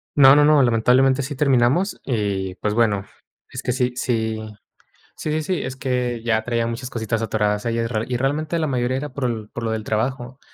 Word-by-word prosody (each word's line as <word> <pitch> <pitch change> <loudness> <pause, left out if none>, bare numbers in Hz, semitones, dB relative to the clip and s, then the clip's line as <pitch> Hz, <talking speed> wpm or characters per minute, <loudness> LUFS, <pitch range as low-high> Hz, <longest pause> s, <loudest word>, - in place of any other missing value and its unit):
No, 135 -1 +8
no, 145 - +5
no, 150 -1 +5
lamentablemente 125 +3 +3
sí 145 +2 -5
terminamos, 135 - +2
y, 100 -6 -2
pues, 105 -1 -2
bueno, 105 -4 +1 0.5
es - - -5
que 125 - -1
sí 125 0 0
sí 110 -3 -1 0.8
sí, 155 - -3
sí, 155 +1 0
sí, 180 +3 -2
es 130 0 -5
que 125 -3 -2
ya 110 -2 +1
traía 115 -1 -1
muchas 125 +2 -5
cositas 115 -1 -2
atoradas 105 -1 0
ahí. 115 0 -1
Y 115 +1 -2
y 120 - +1
realmente 150 +5 -1
la 155 - 0
mayoría 130 -1 0
era 145 +2 -4
por 120 -6 -3
por 120 - -6
lo 115 - -1
del 110 -1 -3
trabajo. 125 +4 -2
125 Hz, 200 wpm, -22 LUFS, 110-135 Hz, 0.8 s, No